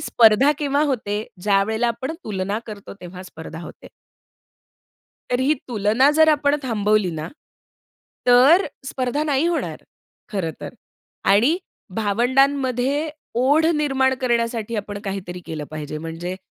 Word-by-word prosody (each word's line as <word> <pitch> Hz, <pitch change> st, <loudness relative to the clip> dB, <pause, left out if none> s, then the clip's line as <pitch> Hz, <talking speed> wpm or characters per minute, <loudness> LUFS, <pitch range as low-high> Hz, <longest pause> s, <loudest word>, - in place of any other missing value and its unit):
स्पर्धा 225 Hz, +4 st, +5 dB
केव्हा 285 Hz, 0 st, +1 dB
होते? 215 Hz, -6 st, -1 dB, 0.2 s
ज्यावेळेला 210 Hz, +4 st, +2 dB
आपण 260 Hz, +6 st, -3 dB
तुलना 200 Hz, 0 st, -2 dB
करतो, 205 Hz, -2 st, -9 dB
तेव्हा 180 Hz, +1 st, -9 dB
स्पर्धा 165 Hz, -2 st, -9 dB
होते. -, -, -11 dB, 1.4 s
तर 245 Hz, -, +1 dB
ही 285 Hz, +4 st, +3 dB
तुलना 225 Hz, +5 st, +3 dB
जर 315 Hz, +1 st, +5 dB
आपण 295 Hz, -1 st, +3 dB
थांबवली 210 Hz, -5 st, +1 dB
ना, 155 Hz, -1 st, -5 dB, 1.0 s
तर 260 Hz, +10 st, +6 dB, 0.2 s
स्पर्धा 260 Hz, +3 st, -1 dB
नाही 290 Hz, 0 st, +1 dB
होणार 345 Hz, -1 st, -2 dB, 0.5 s
खरं 185 Hz, -5 st, -1 dB
तर -, -, -6 dB, 0.6 s
आणि 245 Hz, -, +4 dB, 0.4 s
भावंडांमध्ये 260 Hz, +6 st, +1 dB, 0.3 s
ओढ 290 Hz, +5 st, +4 dB
निर्माण 270 Hz, -3 st, +2 dB
करण्यासाठी 235 Hz, -2 st, 0 dB
आपण 205 Hz, 0 st, -4 dB
काहीतरी 190 Hz, -2 st, -5 dB
केलं 155 Hz, -2 st, -5 dB
पाहिजे. 155 Hz, -1 st, -5 dB
म्हणजे 165 Hz, +3 st, -5 dB
230 Hz, 120 wpm, -22 LUFS, 200-275 Hz, 1.4 s, तर